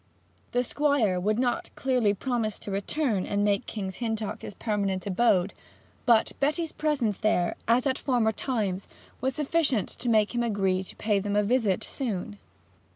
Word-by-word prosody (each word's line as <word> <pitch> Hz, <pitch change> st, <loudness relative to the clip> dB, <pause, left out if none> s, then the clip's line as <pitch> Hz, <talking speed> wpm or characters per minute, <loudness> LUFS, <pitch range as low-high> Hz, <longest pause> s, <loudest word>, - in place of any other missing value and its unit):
The 245 Hz, 0 st, +2 dB
Squire 255 Hz, -9 st, +1 dB
would 210 Hz, +4 st, +1 dB
not 245 Hz, -1 st, 0 dB
clearly 250 Hz, -6 st, +2 dB
promise 230 Hz, -2 st, -1 dB
to 205 Hz, -, -7 dB
return 205 Hz, +1 st, -1 dB
and 205 Hz, 0 st, 0 dB
make 205 Hz, -1 st, +1 dB
King's 190 Hz, -3 st, -5 dB
Hintock 225 Hz, -3 st, -2 dB
Court -, -, -7 dB
his 205 Hz, -, -7 dB
permanent 200 Hz, -4 st, -1 dB
abode; 195 Hz, -2 st, +2 dB, 0.5 s
but 230 Hz, -2 st, +5 dB
Betty's 310 Hz, +3 st, 0 dB
presence 275 Hz, -10 st, 0 dB
there, 180 Hz, -5 st, +1 dB
as 235 Hz, +3 st, +3 dB
at 265 Hz, -1 st, +1 dB
former 240 Hz, -5 st, +2 dB
times, 210 Hz, -7 st, -2 dB, 0.3 s
was 260 Hz, +1 st, 0 dB
sufficient 290 Hz, -, +1 dB
to 245 Hz, -, -4 dB
make 215 Hz, -1 st, +3 dB
him 240 Hz, -, 0 dB
agree 195 Hz, -5 st, +1 dB
to 190 Hz, -, -8 dB
pay 210 Hz, -2 st, +1 dB
them 205 Hz, +1 st, -2 dB
a 210 Hz, -, +4 dB
visit 215 Hz, -3 st, +1 dB
soon. 210 Hz, -5 st, -4 dB
220 Hz, 165 wpm, -27 LUFS, 200-255 Hz, 0.5 s, but